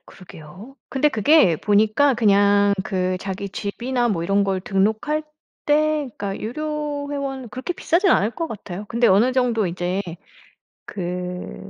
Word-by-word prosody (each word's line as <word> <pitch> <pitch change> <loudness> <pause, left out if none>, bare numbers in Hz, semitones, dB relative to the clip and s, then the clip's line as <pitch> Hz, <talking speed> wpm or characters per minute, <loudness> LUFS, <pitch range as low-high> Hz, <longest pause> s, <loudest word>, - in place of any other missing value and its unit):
그러게요. 185 - -13
근데 270 +3 +2
그게 260 - +4
보니까 215 - +3
그냥 205 -2 +4
그 185 -1 -1
자기 195 0 -5
집이나 240 +5 -2
뭐 175 -7 -1
이런 195 +3 +2
걸 190 -1 -1
등록할 220 +11 0 0.4
때 300 -1 +2
그러니까 200 -1 -4
유료 295 +3 -4
회원 270 -3 -4
그렇게 255 +10 -5
비싸진 370 +1 +1
않을 205 +3 +3
것 330 +8 -3
같아요. 200 - -7
근데 235 +1 +2
어느 220 +7 +4
정도 245 -5 +1
인제 180 +2 -2 0.8
그 180 -1 -5
215 Hz, 285 characters per minute, -22 LUFS, 195-275 Hz, 0.8 s, 그게